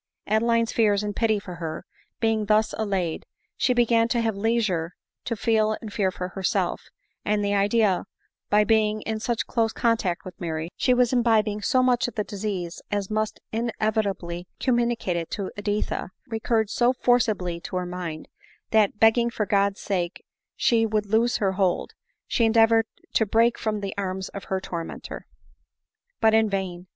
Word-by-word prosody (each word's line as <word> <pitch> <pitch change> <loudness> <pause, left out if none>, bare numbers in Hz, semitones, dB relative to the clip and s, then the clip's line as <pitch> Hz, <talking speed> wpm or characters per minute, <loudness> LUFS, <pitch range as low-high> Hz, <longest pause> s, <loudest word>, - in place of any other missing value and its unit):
Adeline's 230 +2 +2
fears 210 -3 +2
and 205 -1 -3
pity 220 -2 +2
for 180 -3 -8
her, 160 -2 -5 0.3
being 225 -2 +1
thus 215 +1 +3
allayed, 190 -6 -2 0.3
she 255 - +1
began 235 -2 +3
to 235 0 0
have 225 -2 0
leisure 200 -6 0 0.3
to 230 - -1
feel 215 0 +1
and 215 -2 -8
fear 195 -2 +1
for 180 0 -5
herself; 190 -1 -1 0.4
and 205 0 0
the 200 - +1
idea, 205 -1 +3
that - - -8 0.4
by 210 +1 +5
being 215 -1 +2
in 220 -1 -3
such 235 +1 -1
close 225 -2 0
contact 225 -8 0
with 185 0 -10
Mary, 165 0 -3
she - - +1
was 250 0 +3
imbibing 220 -4 +2
so 255 +5 +2
much 250 -1 +2
of 245 - -8
the 210 - 0
disease 195 -4 -4
as 205 -1 -2
must 215 0 -1
inevita 220 -3 0
bly 170 0 -7
communicate 240 -7 +1
it 165 -1 -4
to 195 -2 -4
Editha, 205 -3 -2 0.2
recurred 220 -2 0
so 245 +1 +3
forcibly 215 -9 +1
to 175 - -7
her 180 0 -1
mind, 175 -3 -5 0.4
that, 215 -2 +3
begging 235 +1 +5
(or 210 - +2
God's 200 0 +1
sake 180 -3 -2 0.3
she 230 -2 +3
would 215 -1 0
loose 225 +4 +2
her 195 -2 +1
hold, 190 -2 0 0.3
she 235 - 0
endeavored 225 0 +4 0.3
to 220 - +2
break 230 +3 +3
from 215 -2 -2
the 195 -1 -4
arms 190 -1 -3
of 200 - -8
her 190 - -1
tormenter. 170 -3 -7 0.9
But 220 0 +4
in 220 -1 +4
vain. 185 -2 -3
215 Hz, 170 wpm, -25 LUFS, 190-225 Hz, 0.9 s, by